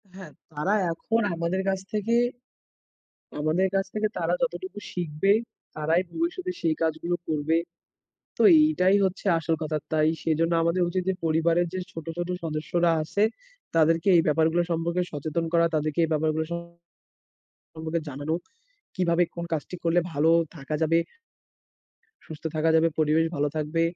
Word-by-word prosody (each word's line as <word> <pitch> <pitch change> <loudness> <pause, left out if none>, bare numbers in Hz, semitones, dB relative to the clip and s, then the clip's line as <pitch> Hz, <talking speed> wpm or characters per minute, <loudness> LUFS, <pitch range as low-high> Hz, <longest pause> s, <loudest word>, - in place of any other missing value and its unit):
হ্যাঁ, 190 -1 -10 0.2
তারা 155 +6 -1 0.2
এখন 225 +7 -1
আমাদের 170 +3 -1
কাছ 190 0 0
থেকে, 215 +2 +1 1.3
আমাদের 160 +5 +2
কাছ 195 0 +2
থেকে 215 0 +1
তারা - - +1
যতটুকু 375 - -3
শিখবে, 175 +2 +1 0.4
তারাই 160 +3 +2
ভবিষ্যতে 355 +2 -2
সেই 160 -1 +1
কাজগুলো 165 +2 0
করবে। 155 +1 0 0.8
তো - - +1 0.2
এইটাই 200 -11 +3
হচ্ছে 190 +2 -2
আসল 165 0 0
কথা। 155 0 -1 0.2
তাই 155 0 +3
সেজন্য 165 +1 +1
আমাদের 170 +2 +1
উচিত 185 +1 -1
যে 190 - +2
পরিবারের 165 +2 +2
যে 185 - -3
ছোট, 165 0 -8
ছোট 175 0 -3 0.2
সদস্যরা 165 +2 0
আছে, 180 +6 -1 0.5
তাদেরকে 165 +3 +3
এই 165 - +5
ব্যাপারগুলো 160 +3 +3
সম্পর্কে 170 +2 0
সচেতন 155 +3 -2
করা। 170 0 +4
তাদেরকে 155 0 -1
এই - - -1
ব্যাপারগুলো 155 +1 +1
সম্পর্কে 170 0 -9 1.1
জানানো, 145 +3 -3 0.6
কিভাবে 175 -1 +2
কোন 170 - -3
কাজটি 160 +3 -3
করলে 170 +1 +3
ভালো 150 +3 +3 0.3
থাকা 140 +1 -5
যাবে, 165 +1 +3 1.3
সুস্থ 160 -2 -10
থাকা 160 +1 +2
যাবে, 160 +1 +5
পরিবেশ 155 +1 +3
ভালো 145 +1 +1
থাকবে, 155 +2 0
165 Hz, 145 wpm, -26 LUFS, 155-180 Hz, 1.3 s, এই